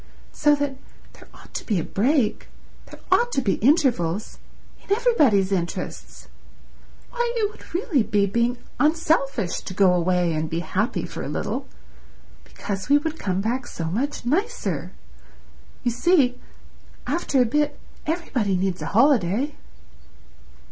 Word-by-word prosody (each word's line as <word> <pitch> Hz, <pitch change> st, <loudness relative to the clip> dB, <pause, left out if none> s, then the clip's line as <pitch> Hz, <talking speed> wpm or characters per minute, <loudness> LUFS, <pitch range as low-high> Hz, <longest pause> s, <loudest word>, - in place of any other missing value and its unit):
So 295 Hz, -1 st, +3 dB
that 285 Hz, -2 st, -2 dB, 0.4 s
there -, -, -16 dB
ought -, -, -17 dB
to -, -, -4 dB
be 205 Hz, -6 st, 0 dB
a -, -, -2 dB
break, 240 Hz, +1 st, +1 dB, 0.4 s
there -, -, -13 dB
ought 480 Hz, +1 st, +4 dB
to -, -, +2 dB
be 200 Hz, -, +1 dB
intervals—in 235 Hz, -, -1 dB
everybody's 300 Hz, -, +3 dB
interests. 175 Hz, -3 st, -4 dB, 0.8 s
Why, 480 Hz, -1 st, -1 dB
it 425 Hz, -3 st, 0 dB
would -, -, -14 dB
really 350 Hz, -, +1 dB
be 205 Hz, -2 st, +2 dB
being 235 Hz, +5 st, 0 dB, 0.2 s
unselfish 290 Hz, -, +1 dB
to 185 Hz, -, -8 dB
go 185 Hz, -2 st, +5 dB
away 180 Hz, -1 st, +1 dB
and 155 Hz, 0 st, -2 dB
be 165 Hz, +1 st, -2 dB
happy 160 Hz, -, -1 dB
for -, -, -7 dB
a -, -, -4 dB
little, -, -, -3 dB, 0.8 s
because 195 Hz, -, -6 dB
we 285 Hz, -, +7 dB
would 315 Hz, +1 st, -3 dB
come 190 Hz, -1 st, -1 dB
back 240 Hz, +4 st, -2 dB
so 165 Hz, -, -5 dB
much 265 Hz, +7 st, -2 dB
nicer. 395 Hz, -, -1 dB, 0.9 s
You 240 Hz, -, +1 dB
see, 250 Hz, -1 st, +3 dB, 0.7 s
after 290 Hz, -5 st, 0 dB
a 250 Hz, -, +5 dB
bit 295 Hz, +4 st, 0 dB, 0.3 s
everybody 255 Hz, -, 0 dB
needs 185 Hz, 0 st, -1 dB
a -, -, -3 dB
holiday." 245 Hz, -, +3 dB
245 Hz, 140 wpm, -24 LUFS, 195-300 Hz, 0.9 s, we